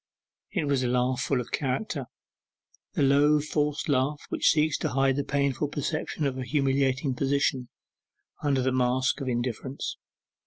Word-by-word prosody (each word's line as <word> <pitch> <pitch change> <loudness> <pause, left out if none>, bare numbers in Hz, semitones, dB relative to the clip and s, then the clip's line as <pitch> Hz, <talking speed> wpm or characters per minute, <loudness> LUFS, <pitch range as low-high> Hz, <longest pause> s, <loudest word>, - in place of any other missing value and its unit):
It 180 -7 -1
was 140 -2 +1
a 125 - 0
laugh 125 +1 +1
full 130 +1 +1
of 125 - -6
character; 140 - -2 0.9
the - - +1
low 145 +2 +5
forced 150 0 -1
laugh 140 +1 +1
which - - +2
seeks 155 0 +3
to 155 - -1
hide 135 0 +2
the 145 - 0
painful 140 0 0
perception 145 +1 -3
of 130 -1 -1
a - - -2
humiliating 135 0 +1
position 135 -1 0 0.7
under 135 -3 +1
the 130 - +1
mask 130 +2 +1
of 135 - -4
indifference. 125 +2 -3
135 Hz, 155 wpm, -27 LUFS, 130-145 Hz, 0.9 s, low